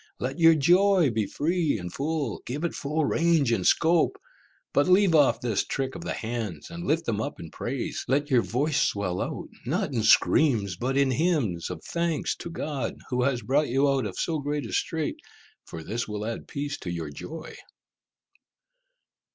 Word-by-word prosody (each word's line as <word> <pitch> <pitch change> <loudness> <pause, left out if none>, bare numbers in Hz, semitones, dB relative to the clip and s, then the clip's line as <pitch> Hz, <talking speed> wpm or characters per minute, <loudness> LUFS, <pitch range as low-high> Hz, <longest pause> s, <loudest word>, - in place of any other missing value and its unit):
Let 135 +4 -3
your 165 -1 +7
joy 175 +1 +4
be 110 -2 -1
free 160 -3 0
and 90 -2 -7
full, 145 -5 -2
give 145 +6 -4
it 170 - -1
full 150 +2 -1
range 160 -6 +2
and 100 -6 +1
scope, 170 - +3 0.6
but - - +3
leave 185 -1 +5
off 145 -4 +4
this 115 -5 0
trick 135 -1 -3
of 170 - -7
the - - -3
hands, 110 - -5
and 170 +1 -6
lift 165 +2 +1
them 110 -2 -1
up - - -5
in 80 -2 -9
praise; 125 +1 -4
let 145 +2 0
your 125 -2 +5
voice 135 +5 0
swell 95 -7 0
out, - - -4
not - - -1
in - - 0
screams, 110 -11 +4
but 130 +7 -1
in 140 -1 +3
hymns 130 - 0
of 90 -3 -7
thanks 170 -2 -1
to - - -7
God, 145 -7 -3 0.2
who 125 0 +1
has 125 -2 0
brought 140 +6 +1
you 135 +3 +3
out 135 -5 +1
of 95 - -8
so 160 -2 -1
great 145 0 -2
a - - -7
strait, 160 -2 -1 0.5
for 80 - -8
this 115 +8 -3
will 105 0 -4
add 115 0 -5
peace 145 0 -4
to 90 - -6
your 85 -4 -4
joy." 160 - -8
140 Hz, 185 wpm, -26 LUFS, 115-160 Hz, 0.6 s, your